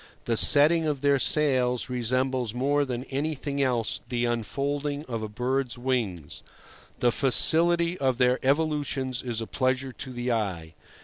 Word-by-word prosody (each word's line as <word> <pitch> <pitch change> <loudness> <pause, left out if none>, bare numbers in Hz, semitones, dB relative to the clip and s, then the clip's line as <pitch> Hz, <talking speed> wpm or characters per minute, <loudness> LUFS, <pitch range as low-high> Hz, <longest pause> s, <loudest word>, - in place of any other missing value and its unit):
The 115 - 0
setting 155 +6 +5
of 145 -3 -2
their 140 -1 +2
sails 130 -5 +1
resembles 125 -1 -1
more 140 +3 +1
than 125 -2 -4
anything 140 0 -3
else 120 -4 -1
the 120 -1 -1
unfolding 140 +5 -3
of 115 -3 -5
a 110 - -5
bird's 125 +3 -2
wings; 115 - -3 0.6
the 120 - +2
facility 170 +7 +3
of 130 -3 0
their 125 0 +1
evolutions 140 -3 -1
is 120 -3 -4
a - - -4
pleasure 130 +1 -2
to 130 - -8
the 120 0 -3
eye. 90 -8 -3
130 Hz, 145 wpm, -26 LUFS, 120-145 Hz, 0.6 s, setting